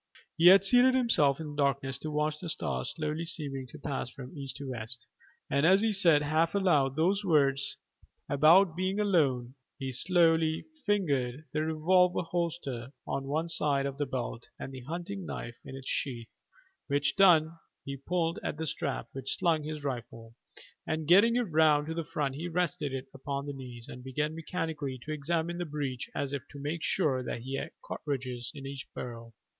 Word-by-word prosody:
He 170 +1 +5
had 195 +1 +8
seated 250 +4 +6
himself 160 - +4
in 155 -2 -5
the - - -9
darkness 140 -2 0
to 155 - -4
watch 150 0 -1
the 175 - -5
stars 65 - -2
slowly 155 +2 -2
seeming 140 -5 -3
to 155 - -11
pass 140 -3 -3
from 130 +3 -10
east 135 -2 -5
to 140 -1 -7
west, 120 0 -6 0.4
and 140 +1 +1
as 190 +5 +5
he 225 - +3
said 170 -7 +4
half 160 +5 +1
aloud 150 -9 +3
those 190 +6 +2
words 140 -5 +2 0.5
about 160 +5 +5
being 185 +3 -1
alone 140 -12 +2 0.2
he 135 -2 -4
slowly 165 +2 +3 0.2
fingered 145 -9 0
the 155 - +1
revolver 175 +4 +3
holster 165 -8 -3
on 135 - -3
one 155 +4 -1
side 145 -4 +1
of 140 0 -4
his 145 -3 -1
belt 120 -2 -4
and 135 - -7
the 130 - -7
hunting 175 +5 -5
knife 120 -8 -6
in 135 - -8
its 135 -1 -9
sheath, 120 -5 -3 0.5
which 145 0 +1
done, 165 -4 +5 0.3
he 140 - -4
pulled 165 +4 -1
at - - -3
the 160 - -3
strap 150 - -3
which 135 0 -2
slung 165 -3 +2
his 150 0 -5
rifle, 115 -4 -5 0.5
and 155 -1 -2
getting 205 +7 +6
it 245 - +3
round 155 -5 +3
to 160 - -4
the 165 0 -2
front 145 -3 -2
he 160 +6 -4
rested 165 -4 -1
it 135 0 -4
upon 140 +1 -4
his 145 -1 -5
knees, 125 -3 -9
and 125 - -9
began 150 +4 -2
mechanically 160 -5 -3
to 155 - -6
examine 165 +3 -1
the - - 0
breech 145 -5 -4
as 140 0 -2
if 140 - -2
to 145 - -11
make 150 +4 -3
sure 150 -8 +1
that 120 -1 -4
he 130 +3 -6
had - - -4 0.2
cartridges 125 -4 -4
in 140 -1 -8
each 135 -1 -6
barrel. 115 -2 -7
150 Hz, 185 wpm, -30 LUFS, 135-165 Hz, 0.5 s, had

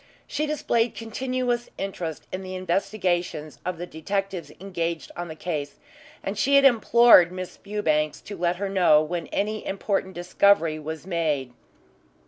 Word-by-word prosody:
She 300 +2 -2
displayed 240 -6 0
continuous 245 +1 -2
interest 175 -5 -4
in 185 - -4
the 185 0 -6
investigations 180 -4 -1
of 180 -1 -3
the 175 - -5
detectives 190 +2 -3
engaged 170 -3 -3
on 175 0 -5
the 160 - -7
case, 150 -4 -4 0.5
and 195 - -3
she 280 +5 +3
had 280 0 +6
implored 235 -7 +7
Miss 185 0 -6
Fewbanks 155 -7 -1
to 205 - -8
let 175 -1 0
her 200 +2 -3
know 180 -6 +4
when 170 +2 -4
any 215 +2 -2
important 195 -1 -2
discovery 175 -2 +3
was 160 +2 -6
made. 155 -8 -1
185 Hz, 145 wpm, -25 LUFS, 165-210 Hz, 0.5 s, implored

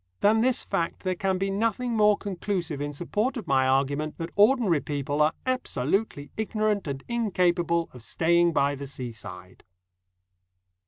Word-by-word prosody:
Than 220 +2 +4
this 255 +1 +2
fact 165 - -2
there 185 -1 -1
can 190 +1 -1
be 195 +1 -1
nothing 230 +4 0
more 210 -1 +4
conclusive 180 -6 -3
in 145 0 -2
support 210 - -2
of 225 - -6
my 130 -1 +2
argument 140 +3 0
that 165 0 -5
ordinary 210 - +4
people 145 0 -2
are 150 +1 +4
absolutely 195 - -1
ignorant 215 -3 0
and 135 -1 -4
incapable 180 -7 +1
of 125 - -11
staying 170 +7 +2
by 140 -2 +2
the 140 0 -6
seaside. 125 -5 -9
175 Hz, 150 wpm, -26 LUFS, 145-210 Hz, -, Than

